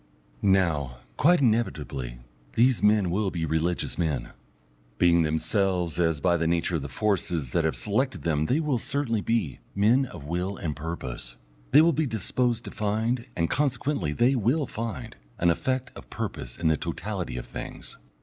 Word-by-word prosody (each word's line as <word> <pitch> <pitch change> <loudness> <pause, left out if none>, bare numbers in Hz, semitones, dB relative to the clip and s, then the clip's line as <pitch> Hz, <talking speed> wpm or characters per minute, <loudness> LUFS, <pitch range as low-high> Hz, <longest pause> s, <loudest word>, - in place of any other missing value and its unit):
Now, 80 -10 +2 0.2
quite 175 +3 +4
inevitably, 80 - 0 0.4
these 125 +1 +3
men 105 -4 +4
will 100 +2 +1
be 85 -3 -2
religious 80 +4 -1
men. 75 -8 -1 0.7
Being 85 +1 +5
themselves, 85 +2 +1
as 80 -3 +2
by 85 +2 +3
the 85 0 0
nature 85 0 +1
of - - -5
the 70 - -5
forces 85 - -1
that 85 +3 +1
have 80 - +1
selected 130 +6 -1
them 75 -2 +1
they 140 - +2
will 150 -6 0
certainly 125 -4 -1
be, 110 - -1 0.2
men 115 +7 +4
of 85 - -10
will 90 +6 -2
and 75 -3 -3
purpose, 65 -6 -5 0.3
they - - +7
will 170 0 +4
be 155 0 +1
disposed 120 +1 0
to - - -6
find, 110 +3 -1
and 85 -1 +1
consequently 135 - 0
they 120 - +3
will 130 +5 +1
find, 115 - -5 0.2
an 85 0 +3
effect 130 +8 -1
of - - -12
purpose - - -5
in 85 - 0
the 80 -1 +3
totality 60 - -4
of - - -5
things. - - -8
95 Hz, 170 wpm, -27 LUFS, 80-120 Hz, 0.7 s, they